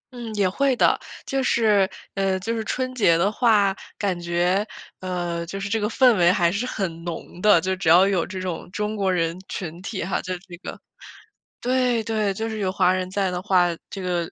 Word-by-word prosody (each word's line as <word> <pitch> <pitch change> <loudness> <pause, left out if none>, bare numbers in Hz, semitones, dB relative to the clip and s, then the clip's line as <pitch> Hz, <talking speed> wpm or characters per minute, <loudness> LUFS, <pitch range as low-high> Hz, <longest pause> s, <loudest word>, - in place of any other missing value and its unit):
嗯， 235 -2 -6
也 200 -2 +2
会 270 +8 +1
的。 - - +3 0.3
就 270 0 -1
是 210 -6 +3 0.2
呃， 195 -1 0
就 225 +5 -2
是 225 - -2
春 255 +3 -2
节 200 -9 +4
的 190 +5 +2
话， 210 -4 +3 0.2
感 195 -4 -1
觉， 175 +3 +1 0.4
呃， 175 -2 -3
就 195 +3 -5
是 195 - -3
这 220 - 0
个 210 0 -1
氛 250 0 +5
围 175 -1 +5
还 175 -2 +2
是 210 +7 -2
很 170 -8 -4
浓 170 +1 -7
的， 210 -4 +6
就 190 +2 -1
只 185 -3 -1
要 180 +4 +7
有 190 -4 +1
这 190 -1 -6
种 180 -3 -5
中 210 +2 -2
国 195 -2 +1
人 165 -2 0
群 170 -2 -6
体 195 -1 -4
哈， 190 +3 -1
就 185 - -4
是 - - -9
这 175 - -9
个 180 - -8 0.8
对， 250 -2 +1
对， 215 -2 0
就 220 +3 -3
是 220 - -4
有 190 -2 0
华 185 -1 +3
人 185 0 -2
在 195 -1 0
的 180 - -2
话， 185 -3 +4 0.2
这 195 - -6
个 175 -2 -2
190 Hz, 230 characters per minute, -23 LUFS, 180-215 Hz, 0.8 s, 要